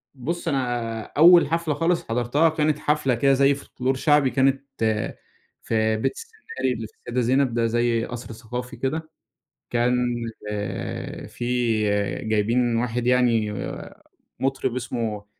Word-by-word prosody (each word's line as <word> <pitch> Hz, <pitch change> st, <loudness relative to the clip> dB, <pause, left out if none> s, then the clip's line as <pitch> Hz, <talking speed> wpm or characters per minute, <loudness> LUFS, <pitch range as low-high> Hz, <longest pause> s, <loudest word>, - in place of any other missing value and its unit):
بُص، 165 Hz, +7 st, -4 dB
أنا 120 Hz, -6 st, -1 dB
أول 170 Hz, +7 st, +6 dB
حفلة 165 Hz, 0 st, 0 dB
خالص 165 Hz, +4 st, +1 dB
حضرتها، 125 Hz, +7 st, +2 dB
كانت 155 Hz, -1 st, 0 dB
حفلة 150 Hz, -4 st, +1 dB
كده 135 Hz, +4 st, +3 dB
زي 140 Hz, +1 st, +4 dB
فولكلور 130 Hz, -1 st, -3 dB
شعبي 145 Hz, 0 st, +3 dB
كانت 135 Hz, 0 st, +2 dB, 1.0 s
في 110 Hz, -1 st, +1 dB
بيت 110 Hz, -, 0 dB
السيناري 435 Hz, -, -4 dB
اللي 110 Hz, -1 st, -5 dB
في -, -, -26 dB
السيدة 125 Hz, +1 st, -3 dB
زينب 130 Hz, +1 st, +2 dB
ده 115 Hz, 0 st, +1 dB
زي 120 Hz, 0 st, +1 dB
قَصْر 120 Hz, -1 st, -7 dB
ثقافي 125 Hz, +2 st, -6 dB
كده. 155 Hz, +6 st, -3 dB, 0.6 s
كان 120 Hz, +1 st, +2 dB, 0.5 s
آآ 105 Hz, -1 st, -5 dB
في -, -, -8 dB, 0.8 s
جايبين 115 Hz, +3 st, +1 dB
واحد 120 Hz, +1 st, -1 dB
يعني 120 Hz, -4 st, +3 dB, 0.9 s
مُطرب 135 Hz, -2 st, -1 dB
اسمه 110 Hz, -4 st, -3 dB
125 Hz, 130 wpm, -24 LUFS, 115-140 Hz, 1.0 s, أول